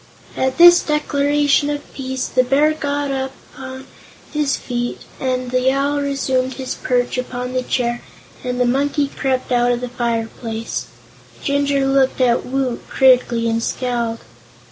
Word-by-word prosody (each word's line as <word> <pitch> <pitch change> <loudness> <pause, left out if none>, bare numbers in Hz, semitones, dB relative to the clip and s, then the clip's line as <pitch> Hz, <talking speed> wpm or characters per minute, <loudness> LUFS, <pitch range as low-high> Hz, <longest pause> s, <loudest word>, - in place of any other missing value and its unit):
At 260 0 0
this 345 0 +9
declaration 290 -1 +1
of 290 0 -5
peace, 260 -1 -3
the 255 - +2
Bear 285 +5 +3
got 285 -2 -2
upon 265 0 -6 0.5
his 295 -3 +1
feet 240 -1 -4 0.2
and 255 -1 -2
the 255 +1 +2
Owl 285 +1 0
resumed 265 -2 -1
his 260 -1 -4
perch 245 0 -1
upon 250 0 -4
the 255 - +1
chair 240 -1 -1 0.4
and 250 -1 -3
the 250 - +3
Monkey 280 +3 +1
crept 260 -2 -1
out 245 0 +3
of 240 - 0
the 250 0 -5
fireplace. 230 -1 -3 0.6
Jinjur 280 -1 +1
looked 270 -1 +2
at 245 -2 +2
Woot 260 -2 -1
critically, 250 -3 +4
and 230 0 0
scowled. 235 -2 -2
260 Hz, 145 wpm, -19 LUFS, 245-280 Hz, 0.6 s, this